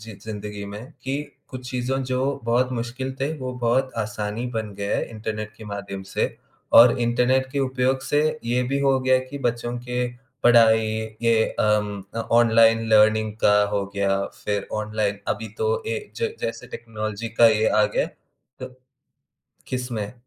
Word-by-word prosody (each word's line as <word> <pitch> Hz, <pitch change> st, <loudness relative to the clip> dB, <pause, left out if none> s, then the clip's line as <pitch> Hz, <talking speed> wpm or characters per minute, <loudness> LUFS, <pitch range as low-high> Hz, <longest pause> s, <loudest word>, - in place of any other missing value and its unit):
जी 110 Hz, 0 st, -9 dB
ज़िंदगी 105 Hz, -1 st, -6 dB
में 105 Hz, -, -7 dB, 0.2 s
कि 135 Hz, +2 st, -1 dB, 0.3 s
कुछ 125 Hz, -1 st, -8 dB
चीज़ों 130 Hz, +2 st, -1 dB
जो 130 Hz, 0 st, 0 dB, 0.2 s
बहुत 125 Hz, +2 st, +1 dB
मुश्किल 125 Hz, +2 st, -4 dB
थे 140 Hz, +3 st, 0 dB
वो 130 Hz, -1 st, -4 dB
बहुत 125 Hz, +2 st, +1 dB
आसानी 105 Hz, +2 st, -3 dB
बन 110 Hz, -2 st, -3 dB
गया 100 Hz, 0 st, -1 dB
है -, -, -1 dB
इंटरनेट 110 Hz, -1 st, -5 dB
के 110 Hz, -, -11 dB
माध्यम 100 Hz, -1 st, -6 dB
से। -, -, 0 dB, 0.4 s
और 120 Hz, +1 st, +8 dB
इंटरनेट 125 Hz, +2 st, +2 dB
के 140 Hz, -, -1 dB
उपयोग 130 Hz, 0 st, +1 dB
से 145 Hz, -, +1 dB, 0.2 s
ये 120 Hz, +2 st, +1 dB
भी 140 Hz, -, +2 dB
हो 135 Hz, -1 st, +3 dB
गया 130 Hz, 0 st, +4 dB
कि 140 Hz, -, -5 dB
बच्चों 120 Hz, 0 st, -2 dB
के 125 Hz, 0 st, -2 dB, 0.4 s
पढ़ाई 115 Hz, -2 st, +6 dB, 0.4 s
ये 115 Hz, -1 st, +4 dB, 0.2 s
अम, 105 Hz, -1 st, +1 dB
अ, -, -, -3 dB
ऑनलाइन 115 Hz, -1 st, +4 dB
लर्निंग 110 Hz, 0 st, +4 dB
का 105 Hz, 0 st, +6 dB
हो 100 Hz, -, 0 dB
गया, 100 Hz, 0 st, +1 dB, 0.2 s
फिर 105 Hz, -1 st, -1 dB
ऑनलाइन 105 Hz, -1 st, -1 dB
अभी 110 Hz, -, -2 dB
तो 460 Hz, +1 st, 0 dB
ए 465 Hz, -, -1 dB, 0.2 s
ज 460 Hz, -1 st, -1 dB
जैसे -, -, -4 dB
टेक्नोलॉज़ी 110 Hz, -1 st, -5 dB
का 120 Hz, -, +10 dB
यह 110 Hz, 0 st, +2 dB
आ 105 Hz, -, +5 dB
गया -, -, +2 dB, 0.5 s
तो 130 Hz, -, -5 dB, 1.0 s
किसमें? 125 Hz, -4 st, -3 dB
115 Hz, 165 wpm, -23 LUFS, 110-130 Hz, 1.0 s, का